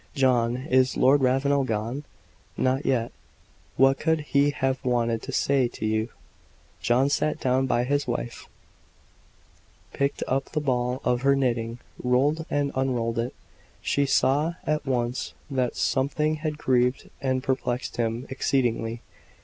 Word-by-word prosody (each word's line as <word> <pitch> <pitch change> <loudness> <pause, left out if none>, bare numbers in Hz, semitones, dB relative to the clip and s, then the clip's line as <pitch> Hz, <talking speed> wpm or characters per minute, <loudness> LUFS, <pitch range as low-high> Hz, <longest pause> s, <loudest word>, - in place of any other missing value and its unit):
"John, 125 -3 +2
is 130 -1 +2
Lord 140 +2 +5
Ravenel 135 +2 +2
gone?" 115 +5 -3 0.5
"Not 130 +2 0
yet." 120 -3 +1 0.7
"What 135 0 +4
could 160 -1 +1
he 145 -1 +2
have 135 -1 -1
wanted 120 -2 +1
to - - -6
say 135 -3 +2
to 110 - -6
you?" 110 +1 0 0.7
John 120 +7 +3
sat 150 +2 0
down 130 +1 +1
by 120 -1 +2
his 145 +3 0
wife, 120 -1 -4 1.5
picked 140 0 -1
up 135 +1 0
the 155 - +1
ball 125 -2 -1
of 125 0 +1
her 140 +1 +4
knitting, 120 -3 -1 0.3
rolled 140 +6 +2
and 145 -1 0
unrolled 120 -3 -1
it. 120 +2 -3 0.5
She 140 0 +1
saw 150 +5 +2
at 150 -2 -1
once 125 -1 -1 0.2
that 130 -2 0
something 150 +3 0
had 155 -1 -3
grieved 125 -2 +1
and 130 -2 0
perplexed 130 -2 -2
him 115 +1 -1
exceedingly. 120 -3 -1
130 Hz, 140 wpm, -26 LUFS, 120-140 Hz, 1.5 s, Lord